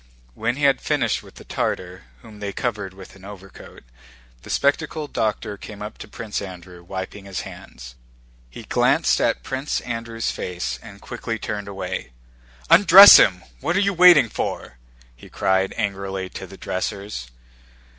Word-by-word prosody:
When 115 - -2
he 145 - -6
had 140 -2 +3
finished 135 -7 0
with - - -17
the - - -12
Tartar, 90 -5 -4 0.2
whom 105 -2 -14
they 100 -1 -4
covered 105 -6 -4
with 95 0 -13
an 95 - -17
overcoat, 95 -1 -12 0.6
the - - -14
spectacled 150 +1 -1
doctor 105 -1 -2
came 105 +1 -9
up 105 - -9
to - - -9
Prince 105 0 -5
Andrew, 90 -2 -10
wiping 95 +2 -7
his 95 -2 -5
hands. 60 -1 -11 0.6
He - - -11
glanced - - +2
at - - 0
Prince 135 +2 -3
Andrew's 115 -1 -4
face 90 -1 -5
and - - -13
quickly 115 - -5
turned 105 -1 -5
away. 95 -10 -6 0.5
"Undress 195 +3 +10
him! 90 -2 +3 0.2
What 175 - -1
are - - +3
you 200 0 +1
waiting 175 -7 +7
for?" - - -5 0.4
he - - -15
cried 95 0 0
angrily 95 -3 -3
to 95 - -8
the 95 +1 -13
dressers. 100 - -5
105 Hz, 155 wpm, -22 LUFS, 95-120 Hz, 0.6 s, Undress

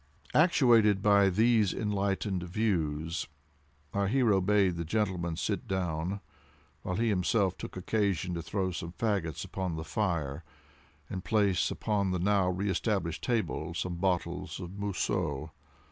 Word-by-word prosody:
Actuated 115 - +5
by 100 -1 +5
these 110 0 +3
enlightened 100 -2 -1
views, 85 -4 -1 0.7
our 100 0 +1
hero 110 -4 +3
bade 95 -2 +3
the 85 - -2
gentleman 90 -2 -1
sit 100 +1 -2
down, 90 +1 -2 0.6
while 90 - -3
he 115 +3 +1
himself 95 0 +1
took - - -8
occasion 95 -2 0
to 85 - -3
throw 95 +2 -2
some 85 -1 -5
fagots 95 -8 -1
upon 95 -3 -3
the 80 - -4
fire, 80 -3 -2 0.6
and 95 -1 -5
place 100 -1 +2
upon 100 -3 0
the 90 - 0
now 95 0 +2
re 95 +3 -1
established 95 -4 -1
table 105 -9 -1
some 90 +1 -2
bottles 90 0 -1
of 90 -2 -6
Mousseux. 90 -6 -2
95 Hz, 135 wpm, -30 LUFS, 85-105 Hz, 0.7 s, Actuated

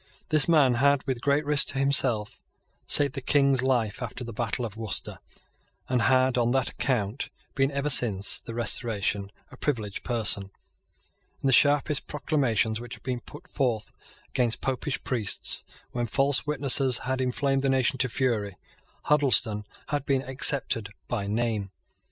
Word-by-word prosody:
This 155 -3 +3
man 145 -6 +4
had, 140 -1 +3
with 130 -3 -3
great 145 +2 +1
risk 145 -1 +4
to - - +1
himself, 130 -6 +1 0.5
saved 140 -2 +5
the 135 - -5
King's 140 -1 +3
life 125 -4 -1
after 125 +1 -5
the 115 -1 -8
battle 120 +2 -2
of 110 -2 -8
Worcester, 110 -3 -5 0.7
and 125 -2 0
had, 130 0 +2
on 120 0 +1
that 135 -1 +1
account, 120 -2 -2 0.3
been, 135 -1 +1
ever 140 0 -3
since 105 -8 +2
the 115 - -9
Restoration, 105 -3 0 0.2
a - - -13
privileged 110 -9 -3
person. 105 -5 0 0.9
In - - -4
the 135 - +3
sharpest 145 +2 +2
proclamations 125 -7 -1
which 120 0 -8
had - - -21
been 125 -1 -3
put 150 +8 -13
forth 120 -6 -2 0.4
against 120 -3 -1
Popish 135 +2 -3
priests, 115 -6 0 0.3
when 120 -1 -3
false 135 +5 +2
witnesses 135 -3 +2
had 130 0 -1
inflamed 135 +2 0
the 135 - 0
nation 130 -1 +1
to 125 - +1
fury, 110 -6 -1 0.5
Huddleston 130 -8 +2 0.2
had 145 -1 -3
been 135 -1 +1
excepted 130 -5 +3 0.2
by 105 -5 -3
name. 110 -2 -2
130 Hz, 155 wpm, -26 LUFS, 115-140 Hz, 0.9 s, saved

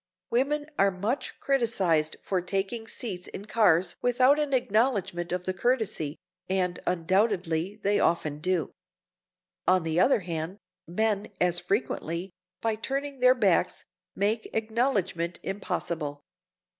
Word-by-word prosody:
Women 285 +5 +1
are 195 - +6
much 205 +8 -3
criticized 195 - +1
for 185 -2 0
taking 195 +5 -2
seats 190 -7 -4
in 200 - -8
cars 185 -6 +3
without 255 +4 +4
an 295 -2 0
acknowledgment 215 -8 +1
of 180 0 -1
the 185 - -1
courtesy, 190 - 0 0.3
and, 185 -2 0
undoubtedly, 185 0 +1
they 205 +1 +3
often 150 -3 +1
do. 180 0 0 1.0
On 185 -1 +4
the 160 +1 0
other 220 +3 +4
hand, 170 +1 -4 0.3
men 210 +3 0
as 175 -1 +3
frequently, 185 -4 -2 0.3
by 225 -1 0
turning 275 +4 -3
their 255 +1 +6
backs, 200 -8 +2 0.3
make 215 +3 0
acknowledgment 215 -7 0
impossible. 170 -6 -3
195 Hz, 120 wpm, -28 LUFS, 175-230 Hz, 1.0 s, are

